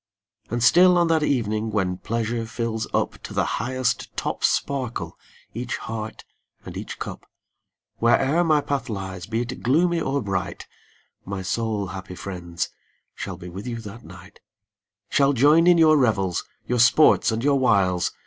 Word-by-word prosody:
And 120 Hz, +1 st, -1 dB
still 180 Hz, +6 st, +6 dB
on 170 Hz, -1 st, +3 dB
that 160 Hz, -1 st, +3 dB
evening, 110 Hz, -6 st, 0 dB
when 95 Hz, -4 st, -1 dB
pleasure 115 Hz, 0 st, -2 dB
fills 110 Hz, -1 st, -3 dB
up -, -, +1 dB
ID -, -, -17 dB
To -, -, -8 dB
the -, -, +2 dB, 0.2 s
highest 130 Hz, -1 st, -2 dB
top -, -, -3 dB
sparkle 130 Hz, -4 st, -1 dB, 0.4 s
each 120 Hz, +2 st, -3 dB
heart 110 Hz, -1 st, -6 dB, 0.4 s
and -, -, -8 dB
each -, -, -6 dB
cup. -, -, -7 dB, 0.7 s
Where'er 135 Hz, +8 st, +3 dB
my 155 Hz, -3 st, +3 dB
path 140 Hz, -3 st, -3 dB
lies, 95 Hz, -3 st, -5 dB
be 115 Hz, +1 st, -1 dB
it 125 Hz, +1 st, -5 dB
gloomy 165 Hz, +6 st, +2 dB
or 140 Hz, -1 st, 0 dB
bright, 95 Hz, -2 st, -3 dB, 0.6 s
My 95 Hz, 0 st, -5 dB
soul, 105 Hz, +2 st, -1 dB
happy 95 Hz, -1 st, -7 dB
friends, 85 Hz, -2 st, -5 dB, 0.4 s
shall 95 Hz, -3 st, -6 dB
be 90 Hz, -1 st, -10 dB
with 95 Hz, +7 st, -8 dB
you 120 Hz, -1 st, -3 dB
that 110 Hz, +2 st, -10 dB
night; 90 Hz, +3 st, -14 dB, 0.7 s
Shall 140 Hz, 0 st, +3 dB
join 150 Hz, +6 st, +5 dB
in 175 Hz, -1 st, +6 dB
your 155 Hz, -2 st, +6 dB
revels, 95 Hz, -, +1 dB, 0.2 s
your 125 Hz, 0 st, -1 dB
sports 125 Hz, +2 st, +5 dB
and 110 Hz, +2 st, -2 dB
your 140 Hz, -1 st, +3 dB
wiles. 95 Hz, -8 st, +2 dB
115 Hz, 160 wpm, -24 LUFS, 100-140 Hz, 0.7 s, still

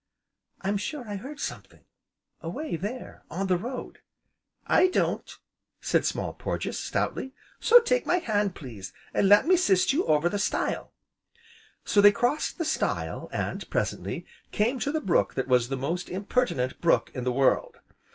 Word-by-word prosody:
"I'm 200 Hz, +1 st, 0 dB
sure 245 Hz, +4 st, -5 dB
I 205 Hz, -1 st, -4 dB
heard 275 Hz, +8 st, -9 dB
something, -, -, -7 dB, 0.6 s
away 180 Hz, -, -4 dB
there 210 Hz, +9 st, -6 dB
on 190 Hz, +4 st, -2 dB
the 185 Hz, -1 st, +2 dB
road!" 245 Hz, +8 st, -6 dB, 0.7 s
"I 370 Hz, -, +5 dB
don't!" 365 Hz, -, -1 dB, 0.4 s
said -, -, +1 dB
Small -, -, -2 dB
Porges, -, -, -3 dB
stoutly, 265 Hz, -, -2 dB, 0.3 s
"so 485 Hz, +1 st, +8 dB
take 485 Hz, +1 st, 0 dB
my 360 Hz, -, +3 dB
hand, 210 Hz, -, 0 dB
please, 105 Hz, -, -9 dB, 0.2 s
an' 195 Hz, -, +3 dB
let 205 Hz, +1 st, +7 dB
me 370 Hz, +3 st, +5 dB
'sist 200 Hz, -, +3 dB
you 330 Hz, +6 st, +2 dB
over 150 Hz, +2 st, +3 dB
the 205 Hz, +3 st, -1 dB
stile." -, -, -1 dB, 0.9 s
So 205 Hz, -, +4 dB
they 205 Hz, 0 st, +9 dB
crossed 245 Hz, +8 st, 0 dB
the 330 Hz, -, -2 dB
stile, 310 Hz, -, -2 dB
and, -, -, -3 dB
presently, -, -, -2 dB, 0.3 s
came 235 Hz, +5 st, +1 dB
to 285 Hz, -, -1 dB
the 315 Hz, 0 st, -1 dB
brook 185 Hz, -, +1 dB
that 130 Hz, -1 st, -1 dB
was 125 Hz, -2 st, +3 dB
the 135 Hz, -, -2 dB
most 165 Hz, +7 st, -3 dB
impertinent 195 Hz, -, -1 dB
brook 170 Hz, -, +2 dB
in 125 Hz, -, -4 dB
the 125 Hz, -, 0 dB
world. 135 Hz, +1 st, +1 dB
205 Hz, 160 wpm, -27 LUFS, 165-270 Hz, 0.9 s, they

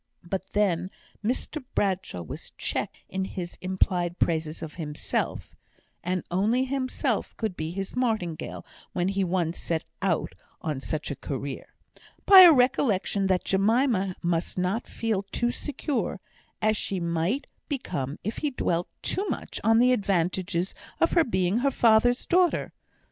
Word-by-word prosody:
But 190 Hz, +2 st, -5 dB
then 185 Hz, -4 st, +1 dB, 0.3 s
Mr 260 Hz, +6 st, -2 dB
Bradshaw 190 Hz, -, -1 dB
was 80 Hz, -, -8 dB
checked -, -, -2 dB
in 190 Hz, 0 st, -2 dB
his 180 Hz, -2 st, -5 dB
implied 185 Hz, -1 st, 0 dB
praises 160 Hz, -1 st, 0 dB
of 155 Hz, -, -6 dB
himself 150 Hz, -3 st, -3 dB, 0.5 s
(and 180 Hz, +1 st, -1 dB
only 220 Hz, +8 st, +2 dB
himself 265 Hz, -1 st, -1 dB
could 220 Hz, -5 st, -2 dB
be 155 Hz, -1 st, -3 dB
his 195 Hz, +5 st, -4 dB
martingale 220 Hz, -10 st, -2 dB, 0.3 s
when 175 Hz, +1 st, +1 dB
he 195 Hz, 0 st, 0 dB
once 175 Hz, -2 st, 0 dB
set 165 Hz, -2 st, -1 dB, 0.2 s
out 185 Hz, -4 st, 0 dB, 0.3 s
on 150 Hz, -4 st, -3 dB
such 155 Hz, +2 st, -3 dB
a -, -, -3 dB
career) 140 Hz, -1 st, -6 dB, 0.5 s
by 390 Hz, -1 st, +10 dB
a 355 Hz, -2 st, +11 dB
recollection 245 Hz, -7 st, +2 dB
that 185 Hz, -1 st, +2 dB
Jemima 200 Hz, -1 st, +2 dB
must 170 Hz, +1 st, 0 dB
not 185 Hz, +6 st, -1 dB
feel 220 Hz, -4 st, -1 dB
too 240 Hz, 0 st, +1 dB
secure, 270 Hz, -, -3 dB, 0.4 s
as 215 Hz, 0 st, +4 dB
she 195 Hz, -2 st, -2 dB
might 170 Hz, -, 0 dB, 0.2 s
become 145 Hz, -, -3 dB
if 215 Hz, +4 st, -3 dB
he 300 Hz, -, 0 dB
dwelt 175 Hz, -9 st, -1 dB, 0.2 s
too 395 Hz, +2 st, 0 dB
much -, -, -4 dB
on 225 Hz, 0 st, +5 dB
the 250 Hz, +2 st, +5 dB
advantages 185 Hz, -3 st, 0 dB, 0.3 s
of 335 Hz, -, +3 dB
her 335 Hz, -, +5 dB
being 185 Hz, -, +1 dB
her 275 Hz, +3 st, +3 dB
father's 245 Hz, 0 st, +4 dB
daughter. 360 Hz, -1 st, +2 dB
190 Hz, 145 wpm, -27 LUFS, 175-240 Hz, 0.5 s, a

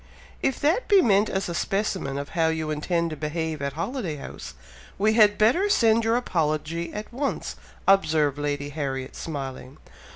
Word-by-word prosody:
"If 270 Hz, -, 0 dB
that 335 Hz, +12 st, +2 dB
be 400 Hz, -2 st, +6 dB
meant 205 Hz, -1 st, +3 dB
as 190 Hz, +1 st, -1 dB
a 170 Hz, -, -3 dB
specimen 190 Hz, -8 st, -1 dB
of 140 Hz, 0 st, -5 dB
how 165 Hz, -1 st, +1 dB
you 160 Hz, -1 st, -1 dB
intend 170 Hz, +2 st, -1 dB
to -, -, -4 dB
behave 155 Hz, 0 st, -3 dB
at 140 Hz, -1 st, -2 dB
Holiday 180 Hz, -, -3 dB
House, 65 Hz, -, -9 dB, 0.4 s
we 215 Hz, +2 st, +3 dB
had 210 Hz, -2 st, +5 dB
better 295 Hz, -, +3 dB
send 230 Hz, -, +4 dB
your 225 Hz, +1 st, +2 dB
apology 165 Hz, -5 st, -1 dB
at 210 Hz, +3 st, -7 dB
once," 275 Hz, +2 st, -3 dB, 0.3 s
observed 155 Hz, -7 st, +3 dB
Lady 145 Hz, -1 st, -2 dB
Harriet, 135 Hz, -3 st, -4 dB
smiling. 135 Hz, -3 st, -6 dB
165 Hz, 165 wpm, -25 LUFS, 150-215 Hz, 0.4 s, be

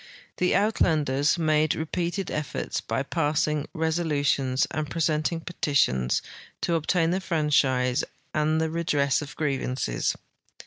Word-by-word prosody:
The 180 Hz, -, +2 dB
Uitlanders 155 Hz, -8 st, +2 dB
made 155 Hz, -2 st, +2 dB
repeated 170 Hz, +3 st, -2 dB
efforts, 155 Hz, -2 st, -3 dB
by -, -, -2 dB
passing 150 Hz, 0 st, 0 dB
resolutions 145 Hz, -5 st, +1 dB
and 150 Hz, 0 st, -3 dB
presenting 165 Hz, +1 st, 0 dB
petitions, 140 Hz, -, +1 dB, 0.4 s
to 170 Hz, -, 0 dB
obtain 165 Hz, +1 st, +1 dB
the 190 Hz, +2 st, 0 dB
franchise 135 Hz, -7 st, +2 dB, 0.3 s
and 155 Hz, +1 st, +1 dB
the 160 Hz, 0 st, 0 dB
redress 150 Hz, -5 st, +1 dB
of 145 Hz, -1 st, -8 dB
grievances. 130 Hz, -, -1 dB
155 Hz, 110 wpm, -26 LUFS, 140-165 Hz, 0.4 s, The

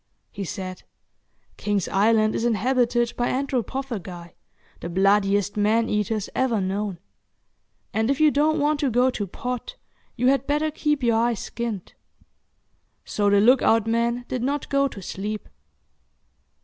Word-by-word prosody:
He 200 Hz, -1 st, -5 dB
said, 185 Hz, +1 st, -6 dB, 0.8 s
"King's 205 Hz, -3 st, -1 dB
Island 215 Hz, +2 st, +3 dB
is -, -, -2 dB
inhabited 240 Hz, +1 st, +1 dB
by 245 Hz, -, 0 dB
anthropophagi, 245 Hz, -9 st, -3 dB, 0.5 s
the 170 Hz, -, -6 dB
bloodiest 195 Hz, +2 st, +2 dB
man 220 Hz, +2 st, +2 dB
eaters 210 Hz, 0 st, -1 dB
ever 250 Hz, -4 st, +1 dB
known; 195 Hz, 0 st, -2 dB, 1.0 s
and, 220 Hz, +2 st, +1 dB
if 275 Hz, -, +1 dB
you 310 Hz, -1 st, +5 dB
don't 300 Hz, +2 st, +2 dB
want 295 Hz, 0 st, +1 dB
to 285 Hz, -3 st, +1 dB
go 250 Hz, +2 st, +3 dB
to 205 Hz, -5 st, -4 dB
pot, 250 Hz, -, -5 dB, 0.4 s
you 250 Hz, -, -1 dB
had 270 Hz, 0 st, +3 dB
better 300 Hz, +2 st, +1 dB
keep 295 Hz, -2 st, -1 dB
your 230 Hz, -2 st, +3 dB
eyes 230 Hz, -2 st, +1 dB
skinned." 230 Hz, -6 st, -5 dB, 1.1 s
So 205 Hz, -1 st, +1 dB
the 200 Hz, 0 st, +4 dB
look 245 Hz, +5 st, +5 dB
out 225 Hz, -1 st, +3 dB
man 235 Hz, +2 st, 0 dB
did 255 Hz, -, -3 dB
not 280 Hz, +3 st, -2 dB
go 275 Hz, 0 st, +2 dB
to 200 Hz, -7 st, -9 dB
sleep. 210 Hz, +4 st, -5 dB
230 Hz, 145 wpm, -24 LUFS, 205-260 Hz, 1.1 s, you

